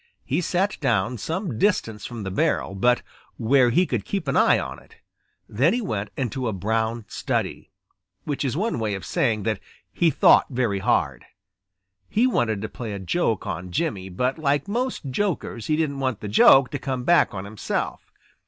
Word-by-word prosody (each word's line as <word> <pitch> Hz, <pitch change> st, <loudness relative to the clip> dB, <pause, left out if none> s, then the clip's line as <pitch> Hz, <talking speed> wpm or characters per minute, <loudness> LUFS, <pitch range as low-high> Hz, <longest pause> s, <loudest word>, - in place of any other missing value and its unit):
He -, -, 0 dB
sat 190 Hz, +3 st, 0 dB
down 115 Hz, +2 st, 0 dB
some 165 Hz, -, -3 dB
distance 115 Hz, -, 0 dB
from 120 Hz, -3 st, -7 dB
the 95 Hz, -, -4 dB
barrel 95 Hz, -, 0 dB
but 120 Hz, +6 st, +2 dB, 0.3 s
where 125 Hz, +2 st, +4 dB
he 175 Hz, +10 st, +3 dB
could 120 Hz, -, -2 dB
keep 195 Hz, -, -3 dB
an 135 Hz, -, 0 dB
eye -, -, +5 dB
on -, -, -5 dB
it. -, -, -21 dB, 0.5 s
Then 135 Hz, -, +2 dB
he -, -, 0 dB
went 105 Hz, -, -3 dB
into 130 Hz, -1 st, -2 dB
a 110 Hz, -, -1 dB
brown 110 Hz, +3 st, -1 dB
study, -, -, -3 dB, 0.5 s
which 145 Hz, -1 st, -3 dB
is 135 Hz, 0 st, -1 dB
one 215 Hz, -, -1 dB
way 105 Hz, -2 st, -1 dB
of 95 Hz, -4 st, -7 dB
saying 110 Hz, +4 st, 0 dB
that 110 Hz, -2 st, -1 dB, 0.3 s
he 170 Hz, -, +3 dB
thought -, -, +5 dB
very 120 Hz, -7 st, 0 dB
hard. -, -, 0 dB, 0.8 s
He 230 Hz, +4 st, +2 dB
wanted 110 Hz, -, 0 dB
to -, -, -2 dB
play 110 Hz, -1 st, -6 dB
a -, -, -4 dB
joke 95 Hz, -3 st, 0 dB
on 90 Hz, +2 st, -4 dB
Jimmy, 95 Hz, -, -2 dB
but 125 Hz, -, -1 dB
like 145 Hz, 0 st, +1 dB
most 245 Hz, -, -2 dB
jokers 150 Hz, -, -2 dB
he 155 Hz, -, +2 dB
didn't 150 Hz, -3 st, -1 dB
want 130 Hz, -5 st, -1 dB
the 105 Hz, -, -6 dB
joke 125 Hz, +5 st, +6 dB
to 145 Hz, -, -3 dB
come 130 Hz, -3 st, -3 dB
back 170 Hz, -5 st, +3 dB
on 95 Hz, 0 st, -5 dB
himself. 105 Hz, 0 st, -4 dB
125 Hz, 185 wpm, -24 LUFS, 105-155 Hz, 0.8 s, joke